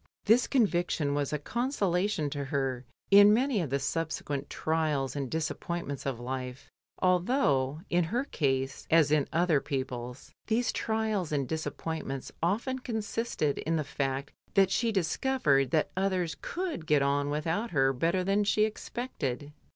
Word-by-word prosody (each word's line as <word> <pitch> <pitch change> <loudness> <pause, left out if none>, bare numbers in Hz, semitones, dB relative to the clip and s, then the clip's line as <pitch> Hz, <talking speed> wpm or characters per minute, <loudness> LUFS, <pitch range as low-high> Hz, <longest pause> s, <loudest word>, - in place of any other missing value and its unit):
This 225 +4 +5
conviction 175 - +1
was 145 -1 -1
a 150 - 0
consolation 195 - 0
to 140 -1 -3
her 135 -3 -2 0.3
in 205 +1 +9
many 245 -1 +2
of 160 - -3
the 140 - +1
subsequent 145 -1 -3
trials 150 -5 -1
and 140 -3 -3
disappointments 160 -2 -3
of 130 -4 -2
life, 125 +1 -5 0.3
al 185 -1 +5
though, 150 - +1
in 175 -1 +2
her 235 +10 -1
case 135 - -1
(as 160 -3 +5
in 150 -2 +3
other 165 -3 +2
people's), 125 -2 -5 0.2
these 230 +1 +1
trials 220 -6 -1
and 140 -3 0
disappointments 160 -3 -4
often 230 +10 0
consisted 220 - -2
in 165 - -1
the 155 - 0
fact 140 0 -3 0.2
that 195 -1 +5
she 230 +3 +1
discovered 170 - +1
that 155 +2 +1
others 185 -3 0
could 340 - -4
get 150 -2 +4
on 140 +1 +1
without 165 +10 -1
her 135 -4 +2
better 170 +8 +1
than 200 +2 +2
she 210 +1 +3
expected. 150 - -4
160 Hz, 150 wpm, -29 LUFS, 140-205 Hz, 0.3 s, in